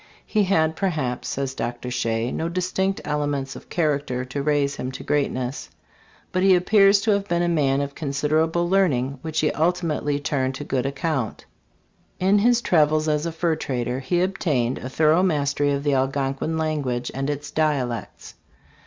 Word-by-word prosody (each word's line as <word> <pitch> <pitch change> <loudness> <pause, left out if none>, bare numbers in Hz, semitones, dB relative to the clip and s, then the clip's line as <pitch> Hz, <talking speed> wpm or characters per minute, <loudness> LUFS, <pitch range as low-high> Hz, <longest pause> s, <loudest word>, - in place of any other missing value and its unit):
He 210 -2 +1
had, 160 -4 +2
perhaps, 150 -11 -2
says 135 -1 -2
Dr. 120 0 -4
Shea, 115 -1 -1
no 165 - -2
distinct 185 +2 -1
elements 145 -2 -2
of - - -12
character 145 -6 -1
to 130 +2 -4
raise 145 -1 +1
him 130 - -4
to - - -7
greatness; 135 -3 -1 0.6
but 185 - 0
he 190 0 +6
appears 195 +2 +5
to 220 - +2
have 200 -1 0
been 175 -1 +1
a - - +1
man 140 -5 +2
of 140 0 -4
considerable 155 +4 0
learning 140 -9 +1
which 155 -1 -2
he 150 - +2
ultimately 160 -3 0
turned 135 -2 -1
to 145 - -5
good 135 -2 -1
account. 140 -3 -2 0.7
In 195 +3 +4
his 240 +2 +3
travels 155 -2 +3
as 150 +1 +1
a - - -2
fur 165 0 0
trader 125 -4 -2
he 175 +7 0
obtained 150 -10 0
a 130 - -6
thorough 155 +5 +3
mastery 145 -5 +1
of 140 0 -1
the 145 -1 +1
Algonquin 135 +3 -1
language 145 -6 -2
and 135 +2 -2
its 145 0 -4
dialects. 135 -8 -2
150 Hz, 170 wpm, -23 LUFS, 135-170 Hz, 0.7 s, he